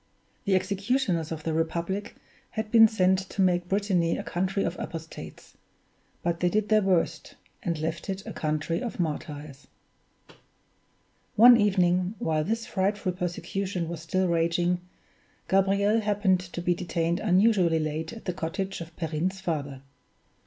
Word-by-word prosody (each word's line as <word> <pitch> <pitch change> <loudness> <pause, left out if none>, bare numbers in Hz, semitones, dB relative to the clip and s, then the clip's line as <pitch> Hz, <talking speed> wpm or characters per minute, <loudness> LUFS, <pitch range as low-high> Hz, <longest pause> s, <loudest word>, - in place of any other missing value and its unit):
The 195 -2 +3
executioners 195 - 0
of 160 -1 -5
the 160 - -1
Republic 170 +5 -2 0.3
had 220 -1 -4
been 225 -1 +8
sent 190 -3 +2
to - - -10
make 175 -1 +2
Brittany 190 -4 +1
a - - -4
country 190 +3 -1
of 170 - -2
apostates; 160 - -8 0.7
they 175 +1 +1
did 210 +2 0
their 215 -1 +5
worst, 190 -4 0 0.3
and 170 -7 -2
left 160 +5 -4
it 195 0 -4
a - - -6
country 155 +4 -1
of 240 -5 -5
martyrs. 145 -3 -4 1.7
One 240 +3 +9
evening, 185 -2 +2
while 155 -3 0
this 225 +6 -2
frightful 195 0 -1
persecution 180 0 -3
was 170 -2 -5
still 185 +3 0
raging, 175 +1 +1 0.7
Gabriel 200 +3 +3
happened 205 -3 +2
to 175 -1 -7
be 175 - +3
detained 170 -1 -1
unusually 185 -4 +3
late 155 +1 -2
at 230 -1 -10
the 180 - -1
cottage 180 +3 -4
of 170 0 -9
Perrine's 165 +3 -2
father. 145 -7 -4
180 Hz, 140 wpm, -27 LUFS, 165-200 Hz, 1.7 s, One